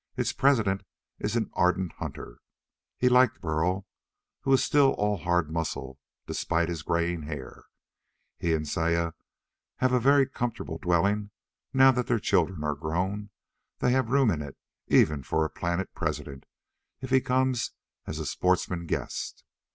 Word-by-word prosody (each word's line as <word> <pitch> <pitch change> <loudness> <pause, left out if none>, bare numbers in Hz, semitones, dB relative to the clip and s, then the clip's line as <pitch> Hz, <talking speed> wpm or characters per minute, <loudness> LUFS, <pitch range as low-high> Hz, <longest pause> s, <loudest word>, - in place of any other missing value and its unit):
Its - - 0
president 110 -9 +2 0.4
is - - -2
an - - -1
ardent 90 0 +1
hunter. - - -7 0.6
He 125 - +2
liked 125 0 +4
Burl, 90 +4 -1 0.5
who 135 - -1
is 135 - +5
still 145 -2 +4
all 105 0 0
hard 85 -1 0
muscle 70 -5 -4 0.3
despite 85 0 0
his 85 -3 -3
graying 85 +1 0
hair. 75 -4 -8 0.7
He 85 -1 +1
and 75 -1 -3
Saya 85 +1 0 0.7
have 130 0 +2
a 125 - +4
very 140 +2 +5
comfortable 115 -10 -4
dwelling, 90 +3 +3
and 105 -1 -5 0.5
now 135 0 +9
that 125 -1 -1
their 120 - +2
children 95 -6 +1
are 75 0 0
grown 90 +8 -2 0.5
they 125 - +2
have 130 -2 +1
room 135 -3 +4
in 75 -4 -2
it 70 -2 -8 0.3
even 75 -2 +4
for 80 +4 0
a 80 - -4
planet 85 +2 -2
president, 70 -2 -4 0.5
if 130 -1 -6
he 130 0 +5
comes 130 -1 +1 0.4
as 80 - -4
a 80 - -4
sportsman 90 +2 0
guest. - - -4
90 Hz, 155 wpm, -28 LUFS, 80-125 Hz, 0.7 s, now